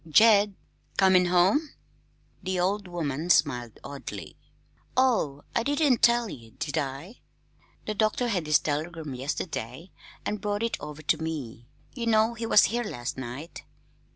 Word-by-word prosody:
"Jed 205 +2 +6 0.4
comin' 185 -2 +5
home!" 185 - +2 0.7
The 185 -1 -2
old 195 +2 0
woman 165 -2 -3
smiled 125 -9 +2
oddly. 140 -1 -8 0.6
"Oh, 220 - +2
I - - +3
didn't 285 0 +2
tell 235 0 +4
ye, 115 - -10
did 145 - -3
I? 145 - -4 0.7
The 215 - -2
doctor 215 +3 +1
had 185 -8 -1
this 150 -1 +5
telegram 155 0 -3
yesterday, 135 +3 -4 0.3
an' 210 - -1
brought 205 +1 -2
it 230 - -1
over 150 +1 -8
to 160 - +2
me. 135 -8 -5 0.3
Ye 235 -3 -4
know 220 +1 +3
he 230 0 -4
was 210 - +7
here 240 +3 +1
last 130 - -5
night. 130 +6 -7
180 Hz, 145 wpm, -27 LUFS, 145-220 Hz, 0.7 s, was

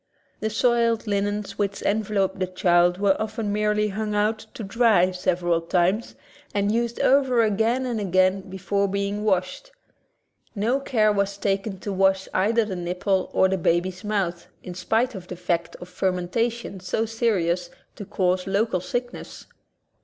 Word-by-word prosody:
The 220 - -1
soiled 230 0 +2
linens 205 0 -2
which 200 -1 -2
enveloped 200 -2 0
the 185 - 0
child 175 -1 +3
were 195 -1 +3
often 215 -1 -3
merely 210 0 +1
hung 210 +1 -3
out 215 +1 0
to 225 - -6
dry 200 -3 +3
sev 180 -1 -1
eral 170 -1 0
times 185 +5 +1 0.4
and 200 0 +1
used 235 +1 -1
over 260 -3 +4
again 225 +4 +1
and 240 -3 -2
again 185 0 +2
be 190 - -7
fore 200 +1 0
being 200 +1 -2
washed. 200 - -1 0.8
No 230 +6 +1
care 220 -6 +2
was 200 -1 -1
taken 195 0 -1
to 200 - -4
wash 190 0 +2
either 220 +4 +2
the 195 -3 -4
nipple 180 +2 -1
or 190 - +4
the 190 0 -1
baby's 175 +4 0
mouth, 195 -5 -2 0.2
in 180 - -7
spite 225 +8 0
of 185 -3 -9
the 180 - -6
fact 170 -1 -2
of 180 - -10
fermentation 190 +5 -2
so 185 +5 -1
serious 185 -7 0 0.3
to - - -7
cause 185 -1 0
local 200 0 +1
sickness. 245 +6 -5
200 Hz, 160 wpm, -24 LUFS, 185-220 Hz, 0.8 s, over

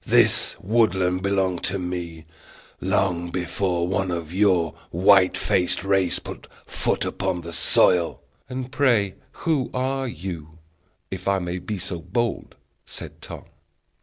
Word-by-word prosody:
"This - - +4
woodland 95 -4 +2
belonged 95 -2 +1
to 90 +2 -1
me 90 -3 -5 0.5
long 85 -3 0
before 90 0 -1
one 95 0 0
of 85 -2 -4
your 90 -5 +3 0.2
white 95 +2 +5
faced 90 - +1
race 95 -2 +2
put - - -8 0.2
foot - - -1
upon 95 -3 -2
the 85 0 -8
soil." 85 +1 +3 0.3
"And, 130 0 -5
pray, 120 -9 +2 0.3
who 150 -7 +1
are 135 +1 -1
you, 85 -6 -7 0.5
if 95 0 -5
I 100 0 +3
may 90 -1 -3
be 105 +3 -4
so 90 -1 -4
bold?" 115 +8 -2 0.3
said - - -9
Tom. - - -8
95 Hz, 135 wpm, -24 LUFS, 85-100 Hz, 0.5 s, white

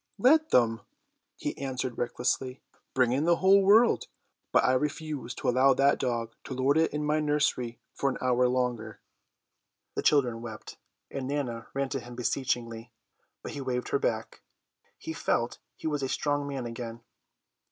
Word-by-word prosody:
"Let 310 +9 +4
them!" 115 -2 +3 0.6
he - - -3
answered 130 -2 -3
recklessly. 125 +1 -1 0.4
"Bring 125 -2 +3
in 140 +5 +1
the 170 0 +5
whole 195 +3 +5
world. 215 +5 +5 0.4
But - - +4
I 130 - +3
refuse 145 -2 -2
to - - -4
allow 130 +2 +5
that 140 +1 +3
dog 115 -2 -2
to 130 - -5
lord 130 +2 +2
it 160 0 +3
in 150 0 -2
my 150 +1 +2
nursery 145 -6 0 0.2
for 140 - 0
an 130 - -3
hour 125 0 +2
longer." 125 -3 -2 0.9
The - - -2
children 125 -6 +2
wept, 110 -2 -8 0.3
and 135 -2 -4
Nana 125 -5 -3
ran 140 -1 0
to 135 - -2
him 120 0 -10
beseechingly, 120 -2 -2 0.5
but - - -5
he 140 - -5
waved 125 -2 -2
her 420 - +1
back. - - -2 0.6
He 320 - -6
felt 120 - -1 0.2
he - - -13
was 150 -2 0
a 135 - -2
strong 145 0 0
man 135 -3 -4
again. 115 0 -6
130 Hz, 165 wpm, -28 LUFS, 120-145 Hz, 0.9 s, the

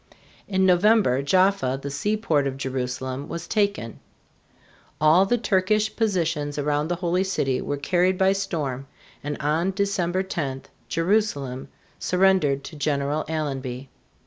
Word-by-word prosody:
In 190 -1 +1
November, 185 - +4
Jaffa, 185 -3 +2
the 140 +1 -6
seaport 160 -3 0
of 135 -1 -4
Jerusalem, 130 +1 -4
was 170 0 -6
taken. 200 - -1 1.0
All 160 +5 +5
the 245 - +2
Turkish 210 0 +1
positions 165 -9 -1
around 145 +1 0
the 175 - -1
Holy 180 +1 0
City 135 -9 -1
were 145 - -3
carried 180 +5 +1
by 190 +1 +4
storm, 150 -9 -3 0.4
and 145 +1 -3
on 155 +5 +1
December 190 -2 0
10 140 -8 -4 0.3
Jerusalem 165 -8 0 0.3
surrendered 180 -7 +2
to 160 - -9
General 145 0 -1
Allenby. 135 -4 -4
160 Hz, 125 wpm, -24 LUFS, 140-190 Hz, 1.0 s, All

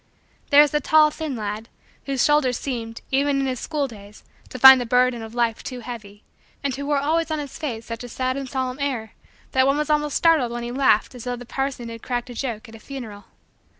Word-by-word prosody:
There 290 +1 +8
was 295 - 0
the 300 - +1
tall, 305 +2 +5
thin, 305 -3 -4
lad 215 +1 -5 0.4
whose 270 -2 +1
shoulders 285 -5 +3
seemed, 230 -4 -5
even 275 +1 +2
in 270 - 0
his 255 -2 -2
school 295 -3 -2
days, 210 -3 -13 0.3
to - - -7
find 265 0 +9
the - - -3
burden 250 0 +2
of 225 +1 -9
life 235 -2 0
too 250 -2 -7
heavy; 215 -4 -9 0.4
and 280 -2 -1
who 280 +2 -5
wore 290 -1 +2
always 320 +4 0
on 315 - -1
his 290 -2 -7
face 230 -7 -4
such 230 +1 -6
a 245 - -8
sad 255 +2 -2
and 270 -1 -5
solemn 260 0 -3
air 250 -6 -3 0.4
that 260 0 +3
one 275 +1 +2
was 300 0 -1
almost 295 -1 +1
startled 315 -8 +3
when 240 0 -4
he 240 - -4
laughed 260 -4 +2
as 245 -2 -9
though 245 0 -2
the 245 0 -10
parson 270 -2 -3
had 230 -1 -8
cracked 245 0 -3
a - - -7
joke 235 -2 -4
at 225 - -14
a 225 - -11
funeral. 220 -5 -9
255 Hz, 235 wpm, -23 LUFS, 235-280 Hz, 0.4 s, find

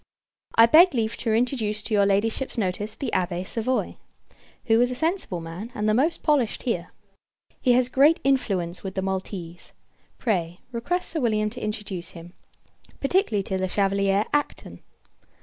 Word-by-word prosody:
I 230 - +8
beg 320 +6 +6
leave 225 -1 0
to 230 - -2
introduce 220 -2 0
to 225 - -3
your 200 -1 +4
Ladyship's 220 +7 0
notice 205 +1 -2
the 265 - -4
Abbé 180 0 -1
Savoye; 235 +6 -2 0.7
who 225 -1 +4
is 245 - +3
a 250 - -3
sensible 320 - -1
man, 170 +8 -7
and 210 0 -1
the 215 - +3
most 295 +9 +1
polished 285 -8 +1
here. 180 -8 -2 0.7
He 250 - +4
has 250 0 +3
great 280 +5 +4
influence 195 -11 0
with 190 -1 -6
the 190 - -1
Maltese. 185 -3 -5 0.4
Pray, 175 -7 -2
request 345 +10 -2
Sir 325 - -1
William 215 -4 +1
to 250 - -7
introduce 200 -5 -4
him 170 +1 -12 0.7
particularly 275 - +1
to 190 0 -2
Le 185 - 0
Chevalier 195 +1 +1
Acton. 295 0 -2
215 Hz, 160 wpm, -24 LUFS, 190-255 Hz, 0.7 s, I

